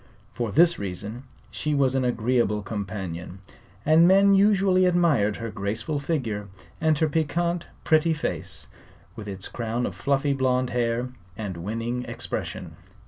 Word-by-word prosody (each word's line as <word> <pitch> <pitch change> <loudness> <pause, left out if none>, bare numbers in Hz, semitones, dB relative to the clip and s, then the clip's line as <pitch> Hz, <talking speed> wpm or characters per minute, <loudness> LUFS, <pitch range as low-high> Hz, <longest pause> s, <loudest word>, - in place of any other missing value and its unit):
For 120 -3 -2
this 170 - +4
reason 100 +6 -5 0.3
she 150 -1 -1
was 135 -2 +2
an 135 -1 +1
agreeable 120 -3 +1
companion, 95 -4 -5 0.5
and 160 +3 +6
men 195 +2 +6
usually 195 -2 +4
admired 160 - +3
her 115 -2 -5
graceful 110 +8 -2
figure 120 -10 -2 0.3
and 155 -1 +3
her 160 - +2
piquant, 170 +3 -1 0.2
pretty 160 0 +3
face 150 - -4 0.5
with 105 - -8
its 95 -1 -6
crown 120 +1 -2
of - - -3
fluffy 140 0 +1
blonde 130 -1 +1
hair 120 +1 0 0.3
and 100 -4 -4
winning 115 +7 -3
expression. - - -5
125 Hz, 140 wpm, -25 LUFS, 105-160 Hz, 0.5 s, and